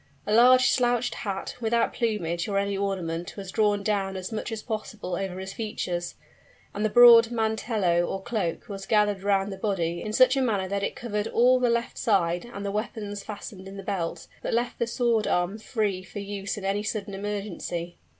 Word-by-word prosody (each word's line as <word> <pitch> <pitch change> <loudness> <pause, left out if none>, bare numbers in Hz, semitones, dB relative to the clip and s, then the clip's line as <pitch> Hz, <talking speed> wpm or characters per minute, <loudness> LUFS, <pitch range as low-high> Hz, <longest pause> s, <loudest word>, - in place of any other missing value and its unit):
A 210 - 0
large 250 +2 +6
slouched 245 -1 +1
hat, 195 -2 -4
without 230 0 +1
plumage 175 -8 -1
or 200 -1 -1
any 200 0 0
ornament, 180 -4 -3
was 195 -2 -6
drawn 205 -2 +2
down 195 -2 0
as 185 +2 -5
much 220 +1 -4
as 220 -1 -5
possible 215 -5 -4
over 190 0 -3
his 190 +1 -6
features; 180 -6 -3 0.6
and 205 - -3
the 215 - +2
broad 235 0 +8
mantello, 220 -6 +1
or 195 - -3
cloak, 210 -8 -2
was 195 -2 -7
gathered 210 -2 +2
round 195 0 +1
the - - -8
body 175 -5 -1
in 215 - -4
such 255 +4 +5
a 270 - +1
manner 205 -7 0
that 200 +1 -2
it - - -2
covered 210 -3 -3
all 250 +2 +4
the 250 -1 +2
left 235 +1 -1
side 185 -2 +1
and 200 -3 -6
the 200 - -1
weapons 210 -1 -4
fastened 200 -2 -8
in 195 +1 -9
the 195 - -7
belt, 185 -4 -3 0.2
but - - -1
left 240 +1 -1
the 235 - +1
sword 235 -2 +1
arm 180 +4 0
free 210 -4 -1
for 185 - -11
use 200 0 -4
in 200 - -6
any 200 +1 0
sudden 210 -1 -4
emergency. 195 -4 -4
205 Hz, 200 wpm, -26 LUFS, 195-225 Hz, 0.6 s, broad